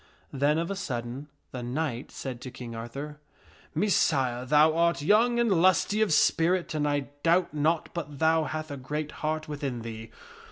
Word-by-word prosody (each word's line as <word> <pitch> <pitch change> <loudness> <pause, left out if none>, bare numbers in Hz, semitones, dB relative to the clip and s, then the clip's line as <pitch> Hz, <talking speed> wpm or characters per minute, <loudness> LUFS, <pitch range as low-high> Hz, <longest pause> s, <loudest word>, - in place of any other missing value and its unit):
Then, 145 +3 +2
of 170 +3 -1
a - - -2
sudden, 130 -6 -5 0.2
the 125 - -5
knight 125 0 -3
said 130 -3 -6
to 130 - -6
King 120 -2 -8
Arthur, 135 +6 -7 0.3
" - - -27
Messire, 135 -9 +1
thou 150 +3 +5
art 170 -3 +2
young 230 +7 +4
and 205 -8 +3
lusty 185 +3 +3
of 215 - +2
spirit 165 +3 +2
and 150 -1 0
I 145 -1 -1
doubt 170 +2 +2
not 155 +2 0
but 150 -4 -5
thou 160 +1 +3
hath 155 0 -4
a 140 - -5
great 150 +3 -4
heart 155 0 -2
within 140 -5 -4
thee. 115 -1 -7
150 Hz, 175 wpm, -28 LUFS, 130-165 Hz, 0.3 s, thou